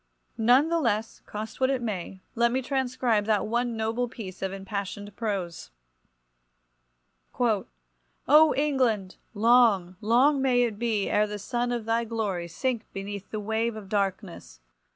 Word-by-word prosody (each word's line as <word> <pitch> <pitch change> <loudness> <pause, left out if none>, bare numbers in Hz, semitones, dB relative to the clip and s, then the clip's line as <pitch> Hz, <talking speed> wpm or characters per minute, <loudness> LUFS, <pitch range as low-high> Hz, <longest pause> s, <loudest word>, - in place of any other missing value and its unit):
None 250 +7 +5
the 335 0 +1
less, 225 -5 -1
cost 215 +4 -7
what 260 - +4
it 270 -2 +1
may, 195 -5 -5
let 235 0 +2
me 260 +1 -1
transcribe 250 -5 0
that 215 -2 +1
one 235 +1 -1
noble 225 +2 -1
piece 190 -6 -9
of 190 -1 -2
impassioned 200 +1 -5
prose— 195 -7 -4 1.7
"O 220 -5 +1 0.9
England! 250 -10 +1 0.2
long, 210 -5 +4
long 260 +6 +4
may 250 -2 +3
it 220 -4 -2
be 225 -4 0
ere 210 0 +2
the 210 0 -5
sun 240 +4 -2
of 240 -2 -2
thy 230 +1 +1
glory 210 -6 -3
sink 235 +6 -3
beneath 200 0 -6
the 215 - -4
wave 220 +2 -1
of 205 -3 -9
darkness! 190 - -3
220 Hz, 145 wpm, -27 LUFS, 200-245 Hz, 1.7 s, None